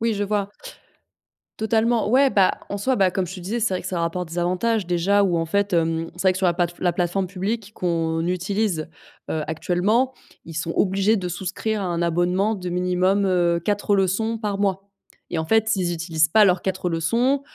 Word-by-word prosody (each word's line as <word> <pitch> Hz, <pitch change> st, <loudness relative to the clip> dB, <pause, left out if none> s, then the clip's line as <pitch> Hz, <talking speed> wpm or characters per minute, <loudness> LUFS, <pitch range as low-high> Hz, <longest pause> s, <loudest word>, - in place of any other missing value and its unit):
Oui, 230 Hz, 0 st, +1 dB
je 205 Hz, -, -2 dB
vois. 205 Hz, -1 st, -1 dB, 1.1 s
Totalement, 220 Hz, 0 st, +1 dB
ouais. 270 Hz, +2 st, +5 dB
Bah, 195 Hz, -5 st, +4 dB, 0.2 s
en 200 Hz, -, -3 dB
soi, 260 Hz, +6 st, 0 dB
bah, 190 Hz, -4 st, +3 dB
comme 185 Hz, -2 st, -1 dB
je 190 Hz, -, -7 dB
te -, -, -8 dB
disais, 205 Hz, +7 st, -3 dB
c'est 210 Hz, -4 st, +1 dB
vrai 185 Hz, -, -2 dB
que -, -, -6 dB
ça 180 Hz, -2 st, -2 dB
rapporte 170 Hz, 0 st, -2 dB
des 175 Hz, -, -3 dB
avantages, 185 Hz, +3 st, 0 dB
déjà, 190 Hz, +4 st, +2 dB
où, 175 Hz, -3 st, +1 dB
en 165 Hz, -, 0 dB
fait, 200 Hz, +3 st, 0 dB
hem, 165 Hz, 0 st, 0 dB
c'est 175 Hz, -, -6 dB
vrai 190 Hz, -, +5 dB
que, 185 Hz, -, -4 dB
sur 190 Hz, -1 st, +1 dB
la 175 Hz, -, +3 dB
plate 175 Hz, -1 st, -1 dB
la 175 Hz, -2 st, +1 dB
plateforme 180 Hz, +2 st, -1 dB
publique 200 Hz, +3 st, -4 dB
qu'on 165 Hz, -2 st, -1 dB
utilise, 180 Hz, -1 st, -1 dB, 0.4 s
heu, 155 Hz, -1 st, -1 dB
actuellement, 195 Hz, -, +1 dB, 0.3 s
ils 165 Hz, -, -9 dB
sont 165 Hz, +1 st, -2 dB
obligés 195 Hz, +3 st, +2 dB
de 180 Hz, -2 st, -3 dB
souscrire 195 Hz, +4 st, -3 dB
à -, -, -2 dB
un 170 Hz, -1 st, -2 dB
abonnement 180 Hz, +5 st, +1 dB
de 180 Hz, -2 st, -5 dB
minimum, 180 Hz, +2 st, +1 dB
heu, 175 Hz, -2 st, +2 dB
4 205 Hz, +1 st, +1 dB
leçons 200 Hz, +4 st, 0 dB
par 210 Hz, -3 st, -3 dB
mois, 195 Hz, 0 st, -1 dB, 0.5 s
et 170 Hz, -, 0 dB
en 160 Hz, -, -1 dB
fait, 220 Hz, +4 st, +2 dB
s'ils 185 Hz, -5 st, 0 dB
utilisent 160 Hz, -1 st, +1 dB
pas 215 Hz, +6 st, +5 dB
leurs 180 Hz, -2 st, +3 dB
4 190 Hz, -1 st, -2 dB
leçons, 235 Hz, -, +1 dB
185 Hz, 210 wpm, -23 LUFS, 175-205 Hz, 1.1 s, ouais